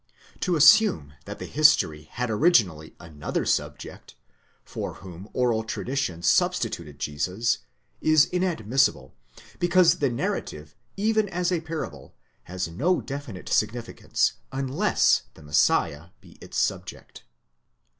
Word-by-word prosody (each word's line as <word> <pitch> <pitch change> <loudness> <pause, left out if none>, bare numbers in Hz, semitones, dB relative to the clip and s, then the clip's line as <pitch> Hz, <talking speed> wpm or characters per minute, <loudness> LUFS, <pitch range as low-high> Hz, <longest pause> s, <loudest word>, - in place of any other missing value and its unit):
Tq 180 -2 0
assume 150 - +5
that - - -7
the - - -7
history 80 - +3
had 125 0 -2
originally 105 - +2
another 75 -3 -4
subject, - - -3 0.5
for - - -6
whom 95 +2 -11
oral 120 -3 0
tradition 115 -6 -3
substi 85 - +2
tuted 75 -4 -8
Jesus, 90 +11 -1 0.4
is 155 -1 +5
inadmissible, 135 - 0 0.5
because 175 -1 +4
the 140 - +2
narrative, 75 -9 -4 0.2
even 215 0 +1
as 180 0 -1
a 175 -3 0
parable, 155 - -7 0.3
has 90 0 -4
no 145 - 0
definite 135 -9 -7
significance 115 +2 0 0.2
unless 135 +9 +2
the 80 - -15
Messiah 75 +1 +1
be - - -18
its - - -8
subject. - - -3
120 Hz, 115 wpm, -25 LUFS, -, 0.5 s, assume